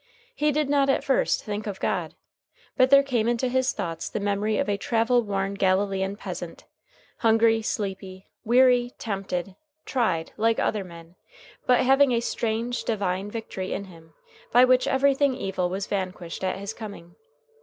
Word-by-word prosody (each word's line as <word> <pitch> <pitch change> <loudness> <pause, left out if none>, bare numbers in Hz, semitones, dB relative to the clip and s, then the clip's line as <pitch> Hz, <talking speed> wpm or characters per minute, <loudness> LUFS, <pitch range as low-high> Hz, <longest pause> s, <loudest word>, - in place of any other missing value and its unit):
He 300 0 +1
did 300 0 0
not 280 -1 +2
at 270 - +2
first 270 - +1
think 210 0 -4
of 195 -2 -5
God; - - -2 0.6
but 255 0 +4
there 275 0 +7
came 240 -5 0
into 240 +2 +1
his 260 +1 +1
thoughts 165 -1 -4
the - - -3
memory 205 +1 0
of - - 0
a 205 - +1
travel 230 +4 +1
worn 195 -2 -2
Galilean 195 0 0
peasant, - - -7 0.5
hungry, 225 0 +3
sleepy, 195 -3 -5
weary, 245 +1 +4
tempted, 195 -3 -4 0.3
tried, 185 -11 -1
like 225 +1 +2
other 210 -2 0
men, 170 -1 -13 0.5
but 250 -1 +5
having 270 0 +4
a 235 - +2
strange, 235 +1 -2
divine 200 -3 -2
Victory 205 -4 -5
in - - -3
him 165 -4 -16 0.4
by 245 +2 +7
which 255 0 +3
everything 275 0 +2
evil 190 -6 -2
was 190 +2 -3
vanquished 185 -3 -4
at 185 0 -1
his 200 +2 -5
coming. 200 -7 -9
215 Hz, 160 wpm, -25 LUFS, 190-245 Hz, 0.6 s, there